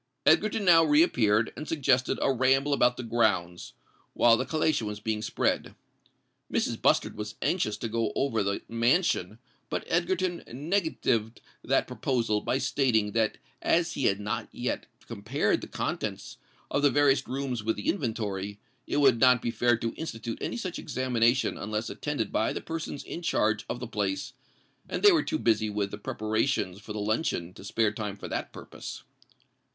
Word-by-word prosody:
Egerton 215 -1 +3
now 165 -2 +7
re 150 0 +5
appeared, 110 -8 +2
and 155 - -7
suggested 130 -5 +2
a 135 - +3
ramble 135 +3 +3
about 125 -3 +3
the 125 - -5
grounds, 110 -7 0 0.4
while 115 -1 +6
the 130 +2 -2
collation 155 -6 +1
was 105 0 -5
being 105 0 -2
spread. - - -1 0.8
Mrs. - - -1
Bustard - - +2
was 105 0 -6
anxious 110 - 0
to - - -3
go 115 0 -1
over 135 -5 +1
the 100 0 -2
mansion; 115 - +1 0.3
but - - -2
Egerton 175 +1 0
negatived 130 - -1 0.2
that - - +2
proposal 115 -5 -1
by 130 - 0
stating 125 -6 +1
that 110 0 +1 0.2
as 170 0 +2
he 135 - -2
had 100 0 +2
not 105 0 -3
yet - - -3 0.2
compared - - -1
the - - -7
contents - - -4 0.3
of 140 - +1
the 145 - +5
various 140 -1 +3
rooms 130 -4 -3
with 110 +1 0
the 105 - -6
inventory, 105 - -2 0.3
it - - -1
would 135 -5 +5
not 125 -1 +6
be 115 - -2
fair 120 +1 +2
to 115 0 -3
institute 115 -7 -5
any - - -3
such 185 -7 -4
examination 125 -1 +1
unless 110 +2 -3
attended 145 -8 -3
by 110 - +1
the - - -3
persons 160 -3 -5
in 170 - -7
charge 110 -10 +1
of 120 - -3
the 125 - -5
place; 105 +2 -2 0.6
and - - -3
they 410 - +9
were 335 -4 +4
too 315 - -2
busy 110 - +1
with 100 -1 -2
the - - -5
preparations 110 -2 -1
for 105 - -9
the 105 - -4
luncheon 105 - -1
to - - -12
spare 105 +1 +1
time 105 -1 -4
for - - -7
that - - -4
purpose. - - -9
120 Hz, 175 wpm, -28 LUFS, 105-145 Hz, 0.8 s, they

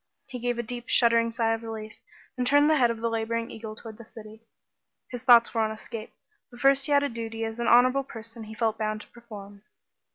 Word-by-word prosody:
He 255 -3 -8
gave 245 0 -2
a 240 - -2
deep 240 +1 -6
shuddering 230 -1 +4
sigh 225 0 0
of 225 - -4
relief, 220 -1 -8 0.4
and 250 -1 -1
turned 290 +3 +4
the 310 - +4
head 245 -3 +4
of 230 -1 -4
the 230 - 0
laboring 230 0 -2
eagle 220 -1 -8
toward 220 -1 -11
the - - -9
city. 220 0 -13 0.7
His 245 -2 -6
thoughts 240 -2 +6
were 225 - +1
on 220 - +1
escape, 220 0 -8 0.4
but 240 - -15
first 275 +1 +3
he - - -3
had 285 0 +4
a - - +1
duty 225 -2 -6
that 225 - -1
as 225 - -13
an 235 - -1
honorable 255 +3 +5
person 230 -2 -9
he 220 +1 -10
felt 225 -1 -1
bound 215 -1 -2
to - - -13
perform. 205 -4 -12
230 Hz, 235 wpm, -26 LUFS, 220-245 Hz, 0.7 s, thoughts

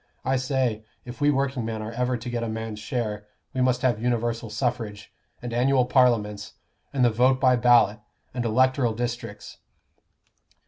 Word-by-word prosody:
I 135 - +2
say, 130 -4 -1 0.2
if 120 +2 -9
we 145 - +4
workingmen 130 -6 -1
are 110 - -5
ever 125 +1 -1
to 120 +2 -7
get 120 -1 -2
a 115 - -3
man's 110 -1 -5
share, 105 -2 -4 0.3
we 130 - -1
must 125 0 +1
have 120 -4 +1
universal 120 -1 -1
suffrage, 105 -3 -3 0.3
and 120 -1 -5
annual 125 +1 +3
Parliaments, 115 -5 +1 0.4
and 130 -3 +2
the 120 - +4
vote 130 +4 +3
by 130 -2 +4
ballot, 120 -3 +4 0.3
and 125 -1 -2
electoral 125 +1 +2
districts." 120 -2 -5
120 Hz, 155 wpm, -25 LUFS, 110-130 Hz, 0.4 s, we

